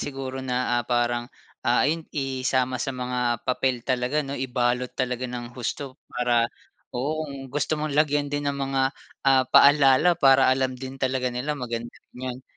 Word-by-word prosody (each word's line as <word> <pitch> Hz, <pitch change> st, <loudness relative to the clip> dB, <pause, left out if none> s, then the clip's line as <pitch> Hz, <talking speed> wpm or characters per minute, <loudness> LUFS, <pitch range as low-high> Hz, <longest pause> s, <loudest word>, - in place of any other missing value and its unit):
siguro 135 Hz, -1 st, -5 dB
na, 125 Hz, -2 st, 0 dB
ah, -, -, -7 dB
parang, 120 Hz, 0 st, 0 dB, 0.4 s
ah, 125 Hz, -, +4 dB
ayun, 160 Hz, +2 st, -1 dB
isama 130 Hz, -2 st, 0 dB
sa 135 Hz, -1 st, -3 dB
mga 125 Hz, -2 st, -1 dB
papel 130 Hz, -1 st, 0 dB
talaga, 130 Hz, +3 st, 0 dB
'no? 135 Hz, -, -5 dB
Ibalot 125 Hz, -1 st, -1 dB
talaga 125 Hz, -1 st, -2 dB
ng 120 Hz, -1 st, -6 dB
husto 130 Hz, +3 st, -5 dB
para 120 Hz, -1 st, +1 dB, 0.5 s
oo 155 Hz, +5 st, -1 dB
kung 135 Hz, -1 st, -8 dB
gusto 145 Hz, +2 st, -1 dB
mong 150 Hz, 0 st, -3 dB
lagyan 145 Hz, -1 st, +1 dB
din 145 Hz, 0 st, -1 dB
ang 140 Hz, -, -2 dB, 0.2 s
mga, 135 Hz, 0 st, +3 dB, 0.4 s
ah, 130 Hz, -1 st, +5 dB
paalala, 145 Hz, +4 st, +6 dB
para 135 Hz, -5 st, +5 dB
alam 130 Hz, 0 st, +2 dB
din 130 Hz, +1 st, -8 dB
talaga 130 Hz, -1 st, 0 dB
nila, 125 Hz, +4 st, -2 dB
maganda 120 Hz, -4 st, -5 dB
rin -, -, -19 dB
'yon. 130 Hz, 0 st, -5 dB
130 Hz, 165 wpm, -25 LUFS, 125-140 Hz, 0.5 s, paalala